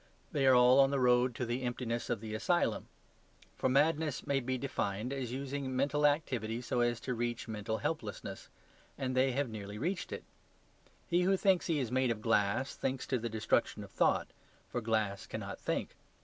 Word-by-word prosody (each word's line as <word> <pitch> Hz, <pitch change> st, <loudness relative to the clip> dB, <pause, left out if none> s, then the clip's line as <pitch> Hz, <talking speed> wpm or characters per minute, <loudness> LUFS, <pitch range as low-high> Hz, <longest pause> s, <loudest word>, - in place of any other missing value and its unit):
They 140 Hz, -2 st, +2 dB
are 130 Hz, -, +7 dB
all 125 Hz, +2 st, +7 dB
on 135 Hz, 0 st, +6 dB
the 140 Hz, 0 st, 0 dB
road 125 Hz, -1 st, +3 dB
to 125 Hz, -, -2 dB
the 120 Hz, +2 st, -2 dB
emptiness 120 Hz, -1 st, -3 dB
of 110 Hz, -, -1 dB
the 110 Hz, -1 st, -6 dB
asylum. 175 Hz, -, +1 dB, 0.7 s
For -, -, 0 dB
madness 150 Hz, +2 st, +2 dB
may 140 Hz, -2 st, +1 dB
be 130 Hz, 0 st, -2 dB
defined 120 Hz, -2 st, -2 dB
as 130 Hz, -4 st, -3 dB
using 135 Hz, 0 st, -3 dB
mental 145 Hz, +3 st, +3 dB
activity 125 Hz, -7 st, -1 dB
so 125 Hz, -, -1 dB
as 120 Hz, -1 st, +1 dB
to 125 Hz, -, -2 dB
reach 120 Hz, 0 st, -2 dB
mental 110 Hz, 0 st, -3 dB
helplessness; 105 Hz, -10 st, -4 dB, 0.5 s
and 130 Hz, -2 st, -2 dB
they 130 Hz, 0 st, +3 dB
have 140 Hz, +1 st, 0 dB
nearly 105 Hz, -2 st, -7 dB
reached 175 Hz, -, -2 dB
it. -, -, -5 dB, 0.8 s
He 175 Hz, 0 st, +2 dB
who 190 Hz, +2 st, +3 dB
thinks 190 Hz, -2 st, +3 dB
he 165 Hz, -, +1 dB
is 130 Hz, -5 st, -2 dB
made 130 Hz, 0 st, +2 dB
of 115 Hz, -2 st, -1 dB
glass, 110 Hz, +3 st, +1 dB
thinks 130 Hz, -1 st, -2 dB
to 130 Hz, -, 0 dB
the 115 Hz, +1 st, -3 dB
destruction 110 Hz, 0 st, 0 dB
of -, -, -12 dB
thought; -, -, +2 dB, 0.4 s
for 120 Hz, -, -2 dB
glass 110 Hz, -3 st, -1 dB
cannot -, -, -6 dB
think. -, -, -2 dB
125 Hz, 190 wpm, -33 LUFS, 115-140 Hz, 0.8 s, are